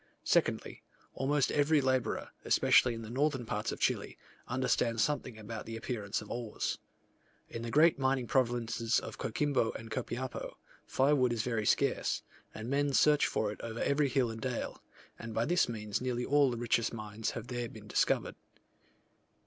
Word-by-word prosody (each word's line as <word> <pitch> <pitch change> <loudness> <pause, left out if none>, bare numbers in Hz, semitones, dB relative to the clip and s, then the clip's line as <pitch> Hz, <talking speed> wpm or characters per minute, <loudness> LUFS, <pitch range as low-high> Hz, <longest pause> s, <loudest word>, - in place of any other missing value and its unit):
Secondly, - - +1 0.3
almost 140 +1 +1
every 150 +1 +3
labourer, 130 -2 0
especially 125 -2 +4
in 115 - -7
the 110 - -8
northern 135 -1 0
parts - - -2
of - - -6
Chile, - - 0 0.3
understands 120 -3 +1
something 145 -6 -2
about 110 0 -7
the 115 0 -5
appearance 110 -3 -3
of - - -11
ores. 120 -3 -3 0.7
In 115 - -6
the 115 - -4
great 155 +4 +5
mining 130 -1 +1
provinces 115 -2 +1
of - - -8
Coquimbo 135 -1 0
and 110 0 -9
Copiapo, 130 +1 -4 0.3
firewood 135 -2 +3
is 115 -2 -1
very 115 -3 -1
scarce, - - +1 0.3
and 110 +1 -7
men 140 +1 +1
search 150 +2 +5
for 105 -1 -1
it 105 - -9
over 115 0 -5
every 140 0 +2
hill 125 -2 +1
and 110 0 -7
dale; 130 -3 -3 0.4
and 115 -1 -7
by 115 - +1
this 175 -2 +2
means 105 -2 -3
nearly 125 -1 -1
all 145 -1 +4
the 120 - -3
richest 115 0 +1
mines 110 -1 -4
have - - -5
there 120 -1 -4
been 110 -1 -12
discovered. - - +1
120 Hz, 165 wpm, -32 LUFS, 115-135 Hz, 0.7 s, great